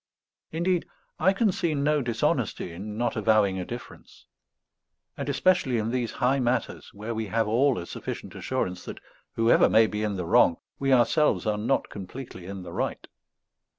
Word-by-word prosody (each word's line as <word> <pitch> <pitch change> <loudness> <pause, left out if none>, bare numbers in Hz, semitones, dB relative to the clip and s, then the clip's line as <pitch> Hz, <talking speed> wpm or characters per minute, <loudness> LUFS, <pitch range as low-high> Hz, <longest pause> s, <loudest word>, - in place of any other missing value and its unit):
Indeed, 170 +2 0 0.3
I 185 +4 +4
can 200 +1 +2
see 170 -3 -1
no 145 +1 +2
dishonesty 115 -6 -1
in 105 +5 -7
not 120 0 0
avowing 110 -3 +3
a 90 - -4
difference; 120 +4 -10 0.9
and 140 0 -4
especially 140 -4 +2
in 110 +1 -1
these 125 -2 -1
high 130 +3 +1
matters, 125 0 -1
where 105 +3 -5
we 110 -1 -3
have 110 +3 0
all 125 +4 +3
a 85 - -4
sufficient - - -6
assurance 90 0 -3
that, - - -7 0.3
whoever 115 +1 +4
may 110 - +6
be 105 -1 -3
in 105 -2 -1
the 90 -2 -3
wrong, 85 0 +4 0.2
we 135 0 +1
ourselves 130 +4 +3
are 105 -1 0
not 120 +6 0
completely 95 -1 -8
in 95 -1 -6
the - - -9
right. - - -3
115 Hz, 170 wpm, -26 LUFS, 105-140 Hz, 0.9 s, may